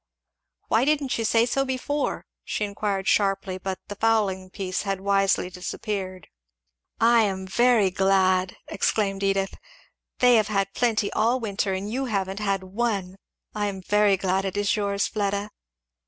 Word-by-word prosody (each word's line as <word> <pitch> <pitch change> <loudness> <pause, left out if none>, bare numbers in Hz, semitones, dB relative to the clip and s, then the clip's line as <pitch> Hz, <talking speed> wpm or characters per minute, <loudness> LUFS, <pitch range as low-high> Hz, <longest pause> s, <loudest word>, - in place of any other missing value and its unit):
"Why 225 +2 +3
didn't 285 -3 +1
you - - 0
say 230 +1 +3
so 270 +3 0
before?" 275 +2 -2 0.2
she 210 - -2
inquired 200 -1 -3
sharply; 195 -2 +1
but 190 0 -4
the - - -5
"fowling 205 -4 +1
piece" 185 -1 -3
had 195 -2 -2
wisely 195 -1 +2
disappeared. 185 0 -5 0.7
"I 230 0 +5
am 190 -3 -1
very 220 0 +3
glad!" 185 -1 +2
exclaimed 200 -1 0
Edith. 195 -1 0 0.6
"They 250 -1 +5
have 215 -2 +2
had 195 -2 -1
plenty 225 -4 0
all 235 +4 +2
winter, 200 -3 -1
and 190 +2 -3
you 265 +3 -1
haven't 195 -4 -2
had 195 -2 -1
one 195 -2 -2 0.4
I 210 -1 -1
am 195 -1 -4
very 205 +1 +3
glad 190 0 0
it 195 0 -3
is 205 0 +1
yours, 200 -1 0
Fleda." 205 0 -2
200 Hz, 155 wpm, -25 LUFS, 190-220 Hz, 0.7 s, I